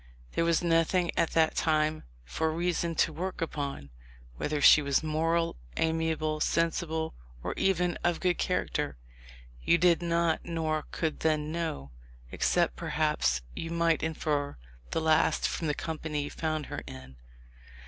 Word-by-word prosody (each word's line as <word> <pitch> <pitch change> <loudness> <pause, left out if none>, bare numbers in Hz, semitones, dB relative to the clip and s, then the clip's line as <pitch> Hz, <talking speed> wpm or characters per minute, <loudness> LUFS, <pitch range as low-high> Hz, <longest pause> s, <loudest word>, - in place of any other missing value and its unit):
There 165 - +1
was 170 0 +2
nothing 170 +1 +2
at 165 - +2
that 160 -1 +3
time 155 -1 +1 0.2
for 160 - -1
reason 170 0 -1
to 160 - +2
work 185 +4 -4
upon. 140 - -4 0.5
Whether 150 - -1
she 150 - +8
was 140 +1 +1
moral, 165 +2 0 0.2
amiable, 160 -1 0
sensible, 160 0 0 0.3
or - - -2
even 180 -2 +1
of 175 -1 +1
good 180 -1 +1
character, 70 - -1 0.6
you 170 - +4
did 175 0 +4
not 170 -1 +1
nor 160 -2 -2
could 160 -2 -2
then 155 -1 0
know, 160 - -3 0.4
except - - +1
perhaps - - 0
you 165 - -4
might 170 -1 +2
infer 150 - -1 0.3
the 165 - -1
last 160 0 +3
from 165 - -3
the 150 - 0
company 155 -3 -3
you 145 - -6
found 155 -2 -2
her - - -5
in. 65 0 -10
160 Hz, 145 wpm, -29 LUFS, 155-170 Hz, 0.6 s, she